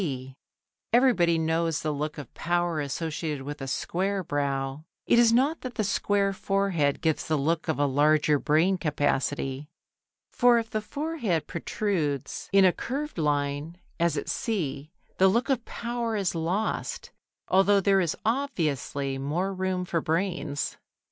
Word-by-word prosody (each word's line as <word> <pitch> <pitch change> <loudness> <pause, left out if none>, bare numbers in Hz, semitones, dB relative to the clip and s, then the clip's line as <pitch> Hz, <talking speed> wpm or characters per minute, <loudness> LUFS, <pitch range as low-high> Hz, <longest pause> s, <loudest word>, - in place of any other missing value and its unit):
B). 130 -6 -4 0.6
Everybody 225 -9 +4
knows 160 0 0
the 155 - 0
look 150 +2 -3
of 145 -5 -9
power 175 -1 0
associated 150 0 -3
with 145 +1 -6
a 135 - -4
square 190 +8 -1
brow: 140 -1 -2 0.2
it 235 - +4
is 235 -1 +6
not 270 +7 +2
that 255 -2 -6
the 215 - 0
square 200 0 +1
forehead 190 -7 0
gives 160 -2 0
the 155 - +1
look 160 +4 0
of 160 - 0
a 145 - +2
larger 150 +1 +3
brain 170 +7 +2
capacity, 145 -2 -1 0.6
for 245 -1 +5
if 225 -1 -2
the 215 - -1
forehead 240 - -2
protrudes 155 - -2
in 195 -1 +6
a 180 - +5
curved 285 - -4
line, 145 +2 -1 0.2
as 170 0 +2
at - - -3
C, 150 -9 -2 0.3
the 190 - +7
look 235 +8 +1
of 255 -3 0
power 235 -1 -3
is 195 -4 0
lost, 175 +6 -2 0.4
although 195 +2 +4
there 195 0 +3
is 170 -3 0
obviously 150 - -1
more 170 +8 -1
room 185 -1 -1
for 170 -2 -1
brains. 160 -4 -2
170 Hz, 150 wpm, -27 LUFS, 145-200 Hz, 0.6 s, the